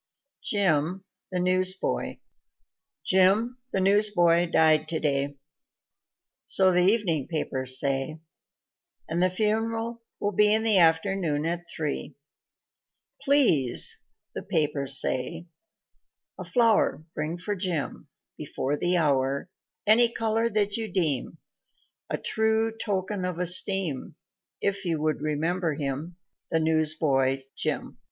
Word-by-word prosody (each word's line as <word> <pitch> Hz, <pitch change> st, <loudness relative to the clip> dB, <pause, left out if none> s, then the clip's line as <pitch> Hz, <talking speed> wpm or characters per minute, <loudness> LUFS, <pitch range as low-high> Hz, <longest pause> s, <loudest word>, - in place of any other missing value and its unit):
Jim, 185 Hz, -2 st, +1 dB, 0.3 s
the 180 Hz, -, -1 dB
Newsboy 185 Hz, +1 st, 0 dB, 0.9 s
Jim, 205 Hz, +7 st, +3 dB
the 195 Hz, -, 0 dB
newsboy, 185 Hz, -4 st, +3 dB
died 155 Hz, -2 st, +3 dB
today, 145 Hz, -3 st, -1 dB, 1.1 s
So 190 Hz, -1 st, +3 dB
the 180 Hz, -, +2 dB
evening 180 Hz, -, +2 dB
papers 130 Hz, -5 st, -1 dB
say 140 Hz, +3 st, -1 dB, 0.9 s
And 165 Hz, +2 st, -1 dB
the 185 Hz, -, +3 dB
funeral 225 Hz, +4 st, -1 dB, 0.2 s
will 205 Hz, -, -1 dB
be 210 Hz, +1 st, +4 dB
In 220 Hz, -, 0 dB
the 215 Hz, -4 st, +4 dB
afternoon 165 Hz, -2 st, +2 dB
at 175 Hz, +1 st, -3 dB
three 150 Hz, -4 st, -4 dB, 1.1 s
"Please" 230 Hz, -, +2 dB, 0.3 s
(the -, -, -5 dB
papers 140 Hz, -3 st, 0 dB
say) 160 Hz, +7 st, -2 dB, 0.9 s
"a -, -, -4 dB
flow'r 225 Hz, -, +2 dB
Bring 155 Hz, +3 st, -3 dB
for 205 Hz, +4 st, -4 dB
Jim 180 Hz, -6 st, -3 dB, 0.3 s
before 140 Hz, +3 st, -3 dB
the 175 Hz, +4 st, +1 dB
hour 140 Hz, 0 st, 0 dB, 0.3 s
Any 230 Hz, +3 st, +6 dB
color 225 Hz, 0 st, 0 dB
that 205 Hz, -1 st, 0 dB
you 220 Hz, -3 st, -5 dB
deem 155 Hz, -9 st, 0 dB, 0.7 s
A -, -, -1 dB
true 220 Hz, 0 st, 0 dB
token 200 Hz, -2 st, -3 dB
of 180 Hz, -2 st, -3 dB
esteem, 180 Hz, -4 st, +1 dB, 0.5 s
If 200 Hz, 0 st, -1 dB
you 165 Hz, -4 st, -1 dB
would 155 Hz, -1 st, -1 dB
remember 160 Hz, +2 st, -1 dB
him 145 Hz, +4 st, -4 dB, 0.3 s
The -, -, +1 dB
newsboy, 155 Hz, -4 st, +1 dB, 0.2 s
Jim. -, -, -3 dB
175 Hz, 115 wpm, -26 LUFS, 155-205 Hz, 1.1 s, Any